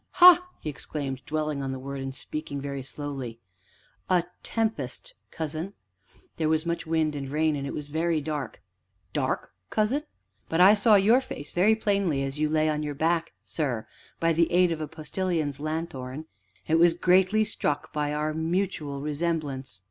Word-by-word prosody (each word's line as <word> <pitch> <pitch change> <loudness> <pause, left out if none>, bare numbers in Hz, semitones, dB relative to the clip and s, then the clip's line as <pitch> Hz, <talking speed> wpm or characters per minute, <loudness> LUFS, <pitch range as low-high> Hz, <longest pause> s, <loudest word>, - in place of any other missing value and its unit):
"Ha!" 355 -1 +9 0.2
he - - -8
exclaimed, 140 -2 -4
dwelling 155 -2 -1
on 135 -1 -2
the 130 - -3
word, 135 +1 -5
and 135 0 -5
speaking 150 0 -5
very 140 0 -4
slowly, 135 -4 -6 0.7
"a 180 -2 +4 0.2
tempest, 225 - -2 0.2
cousin?" 160 +4 -4 0.6
"There 155 -1 +1
was 160 +1 +1
much 170 -1 -2
wind 160 -1 +1
and 135 -2 -4
rain, 155 +1 +1
and 140 -1 -3
it - - -4
was 150 - -5
very 160 +2 +1
dark." 150 -1 -4 0.5
"Dark, - - -1 0.2
cousin?" 220 +7 +1 0.5
"But 165 - 0
I 190 +3 +9
saw 215 +1 +5
your 220 +6 +5
face 150 - -7
very 205 +5 +4
plainly 200 -10 +1
as 135 +2 -4
you 155 0 +2
lay 155 0 +2
on 150 -1 0
your 150 -1 -3
back, 165 +2 +1
sir, 130 -8 -2 0.3
by 165 0 +3
the 165 +1 +2
aid 180 0 +4
of 160 -1 -2
a 155 - -2
Postilion's 155 -1 -2
lanthorn, 155 -2 -4 0.4
and 160 +1 +3
was 170 0 +6
greatly 185 +4 +4
struck 150 -8 -2
by 150 -1 0
our 150 +1 -1
mutual 160 -4 -1
resemblance." 145 - -2
155 Hz, 170 wpm, -27 LUFS, 145-175 Hz, 0.7 s, Ha